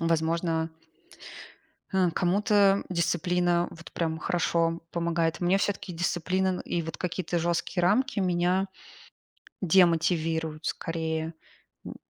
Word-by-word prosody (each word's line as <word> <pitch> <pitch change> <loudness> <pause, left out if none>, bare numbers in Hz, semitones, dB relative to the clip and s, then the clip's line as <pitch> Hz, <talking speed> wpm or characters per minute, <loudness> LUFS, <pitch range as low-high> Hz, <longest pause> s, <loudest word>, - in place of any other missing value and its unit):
Возможно 165 0 0 1.2
хм, 185 -2 +3
кому-то 200 +2 +3
дисциплина 175 0 +1
вот 165 0 -12
прям 160 -1 -2
хорошо 165 -1 0
помогает. 170 -1 0
Мне 180 +2 +3
всё-таки 195 -1 -2
дисциплина 175 +2 0
н 185 - -1
и 170 - -2
вот 165 0 -6
какие-то 175 0 -2
жёсткие 170 +2 -1
рамки 225 +8 +2
меня 180 0 +1 0.9
демотивируют 165 -3 +2
скорее. 160 0 -3 0.5
М - - -7
175 Hz, 105 wpm, -27 LUFS, 165-185 Hz, 1.2 s, хм